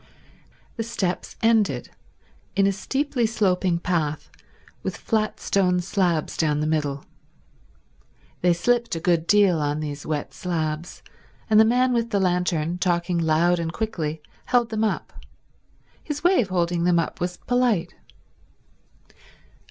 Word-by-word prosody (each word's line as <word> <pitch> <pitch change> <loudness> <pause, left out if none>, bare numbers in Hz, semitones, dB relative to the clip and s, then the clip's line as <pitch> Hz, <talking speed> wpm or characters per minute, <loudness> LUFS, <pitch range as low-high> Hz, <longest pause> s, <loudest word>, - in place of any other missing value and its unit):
The 225 - -1
steps 195 -6 -3
ended 225 -2 +2 0.6
in 195 - +3
a 200 - +3
steeply 265 +4 -1
sloping 185 -5 +1
path 165 -4 -2 0.5
with - - -4
flat 215 -2 -1
stone 180 -2 +1
slabs 175 -3 0
down 150 -2 +1
the 150 - 0
middle. 145 -3 -1 1.4
They 180 - +4
slipped 235 +4 +1
a - - -2
good 170 -1 +1
deal 200 -5 +4
on 145 0 -1
these 145 -1 -5
wet 150 -2 -3
slabs, 160 -2 -3 0.5
and 215 - +7
the 220 - +7
man 250 +2 +3
with 235 -1 0
the 205 -3 +1
lantern, 180 -2 0
talking 175 -1 0
loud 165 +2 +2
and 165 -1 -2
quickly, 160 -8 -3 0.2
held 240 -2 +2
them 220 0 0
up. 220 - -2 0.9
His 295 -1 -5
way 360 -2 +5
of 200 - -4
holding 175 -2 0
them 175 0 +3
up 165 0 -2
was 180 0 -2
polite. 245 -7 0
180 Hz, 135 wpm, -24 LUFS, 165-220 Hz, 1.4 s, and